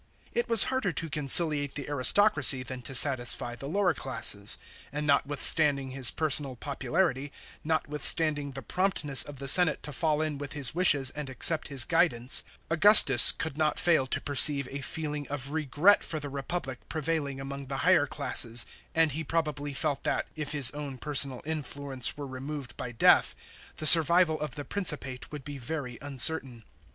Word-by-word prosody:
It 240 - -2
was 230 -4 +8
harder 260 -8 -3
to 165 -2 -5
conciliate 145 -1 +2
the 140 - -8
aristocracy 145 - +2
than 130 0 -9
to 135 - -8
satisfy 120 -3 +2
the 135 +4 -10
lower 190 0 -1
classes; 115 -7 -2 0.3
and 150 +1 -5
notwithstanding 140 -1 +2
his 130 -2 +2
personal 145 -4 -2
popularity, 140 +2 -4 0.3
not 160 0 -3
withstanding 150 -1 +2
the 135 0 -9
promp 185 - -3
ness 135 -3 +4
of 145 0 -2
the 135 +1 -8
senate 170 +1 +5
to 150 - -8
fall 155 +1 -2
in 150 -3 -5
with 145 -1 -8
his 140 -5 -1
wishes 145 -7 +2
and 150 -2 -8
accept 155 +5 -1
his 135 -4 -1
guidance, 140 -8 +1 0.3
Augustus 165 - +7
could 160 -2 -7
not 155 -1 -1
fill 160 -7 0
to - - -3
perceive 140 -1 +2
a 140 +1 -7
feeling 150 +1 -6
of 140 -1 -6
regret 155 +6 +1
for 155 - -5
the 145 -1 -7
Kepublic 140 -1 -6
prevailing 155 -3 -4
among 140 0 -9
the 135 0 -6
higher 175 -5 +2
classes, 120 -5 +1 0.3
and 160 -2 +2
he 160 +4 -5
probably 150 -2 -4
felt 140 0 -4
that, - - -3
if 150 -2 -5
his 145 -4 +5
own 145 -2 -8
personal 140 -1 -1
influence 140 -4 -3
were 145 - -8
removed 135 +1 -9
by 125 - -8
death, 115 - +2 0.4
the 155 - -8
survival 165 0 +6
of 150 -5 -7
the 145 - -8
Principate 150 -10 -1
would 150 -3 -10
be 145 +1 -9
very 125 -2 -7
uncertain. 135 -3 +1
145 Hz, 170 wpm, -26 LUFS, 135-160 Hz, 0.4 s, was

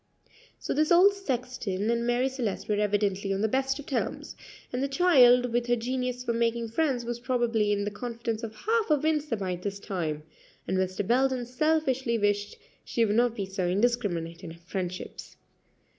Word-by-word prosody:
So - - -3
this 305 +3 +1
old 370 +4 +7
sexton 250 - -2
and 235 0 0
Marie 245 +2 +2
Celeste 250 -7 -3
were 210 - +1
evidently 205 -1 0
on 195 0 -1
the 220 - +3
best 270 +3 0
of 290 - -9
terms, 270 - -3 0.4
and 250 - -1
the 275 - +1
child, 250 -6 +5
with 240 0 0
her 240 - +3
genius 250 +1 -3
for 235 - -1
making 230 0 0
friends, 255 -1 0
was 240 0 -3
probably 235 -4 +1
in 205 0 0
the 205 - -2
confidence 230 +1 -4
of 225 -2 -6
half 445 - 0
of 300 -2 +2
Windsor 305 -5 +1
by 185 -4 -3
this 200 +2 -5
time; 160 -7 -3 0.4
and - - 0
Mr. 185 +1 -1
Belden 255 +2 +2
selfishly 265 -2 +1
wished 205 -1 0 0.3
she 230 - +1
would 210 -1 0
not 240 0 +3
be 200 -4 -3
so 190 -1 -2
indiscriminate 185 -5 0
in 170 - -6
her 165 +1 -12
friendships. 180 0 -6
235 Hz, 185 wpm, -28 LUFS, 205-260 Hz, 0.4 s, old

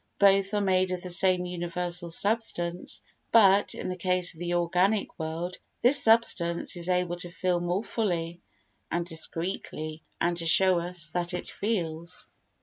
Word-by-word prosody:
Both 195 0 +3
are 205 - +1
made 185 -1 +1
of 180 -1 -4
the 180 - -6
same 180 0 +3
universal 175 0 -2
substance 180 -2 0 0.3
but, 200 -2 +4
in - - -6
the 185 - -4
case 180 0 +1
of 160 - -17
the 175 0 -2
organic 180 +5 0
world, 165 +3 -5 0.3
this 260 +4 +7
substance 195 -8 +3
is 175 +1 -2
able 180 -1 0
to 175 0 -7
feel 180 0 -1
more 175 +4 -2
fully 175 -6 -3 0.5
and 170 0 -2
discreetly 160 -2 -2 0.2
and 175 0 0
to 165 -1 -3
show 185 +1 +6
us 170 -2 -1
that 175 +1 -2
it - - -6
feels. 170 -5 -4
180 Hz, 155 wpm, -27 LUFS, 170-190 Hz, 0.5 s, this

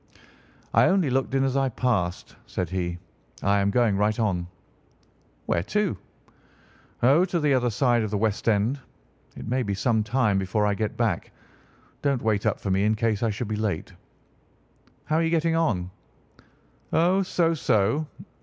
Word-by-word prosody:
"I - - +5
only 185 -8 +2
looked 135 +1 0
in 135 - +3
as 135 -1 0
I 135 -1 +2
passed," 105 -8 -1
said 90 -3 -3
he. 90 -2 -2 0.5
"I 100 0 +3
am 100 0 +2
going 115 -1 +2
right 105 +2 +1
on." 90 -6 0 1.0
"Where 85 - +1
to?" 205 - -1 1.1
"Oh, 140 +8 +5
to 175 -2 -1
the 150 -2 +2
other 125 -2 +2
side 120 +1 +2
of 110 - -2
the 105 - -1
West 110 +1 0
End. 110 +6 +1 0.6
It - - -8
may 130 +3 0
be 100 -4 -2
some 110 +2 +1
time 105 -3 +1
before 95 +2 0
I 105 - +2
get 105 +1 -3
back. 110 -7 -1 0.7
Don't 140 -4 0
wait 110 -2 +1
up - - 0
for 100 - -3
me 95 +1 +2
in 110 +1 +2
case 110 -1 0
I 115 - +1
should 110 +2 -3
be 110 - -2
late." 105 -6 -3 1.1
"How 155 - +1
are 165 - +2
you 165 - +1
getting 165 0 +1
on?" 95 - 0 1.0
"Oh, 180 +4 +3
so 170 -3 +1
so. 120 +1 +1
110 Hz, 175 wpm, -25 LUFS, 100-135 Hz, 1.1 s, I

